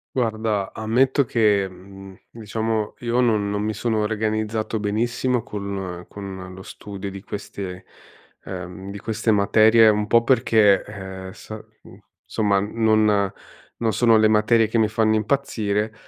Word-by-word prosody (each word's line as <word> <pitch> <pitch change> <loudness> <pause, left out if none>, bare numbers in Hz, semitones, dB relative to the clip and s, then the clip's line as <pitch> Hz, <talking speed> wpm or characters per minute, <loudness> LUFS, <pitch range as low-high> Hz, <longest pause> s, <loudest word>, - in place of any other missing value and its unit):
Guarda, 110 -5 -1
ammetto 130 +5 +2
che, 105 -4 +2
mhmm, 95 +1 -13
diciamo, 110 -1 -3
io 120 +1 0
non 110 -4 +2
non 105 0 -2
mi 110 - -1
sono 110 +1 -1
organizzato 110 +1 -1
benissimo 115 +3 -1
con 100 -6 -6
con 95 -2 -8
lo 95 - -10
studio 100 0 -8
di 95 0 -9
queste 95 -3 -7 0.6
ehm, 95 +1 -7
di 100 - -7
queste 110 +2 -2
materie, 110 +2 +5
un 105 0 +2
po' 115 +2 +4
perché, 110 -5 +3
ehm, 95 -2 -8
sa 110 - -9 0.3
mhmm, - - -15 0.3
insomma 100 -3 +1
non 105 -2 +2 0.5
non 115 -2 0
sono 115 -2 +4
le 110 - +4
materie 110 +1 +3
che 115 - -2
mi 110 -1 +3
fanno 110 0 +1
impazzire, 110 -3 -1
105 Hz, 140 wpm, -22 LUFS, 100-110 Hz, 0.6 s, materie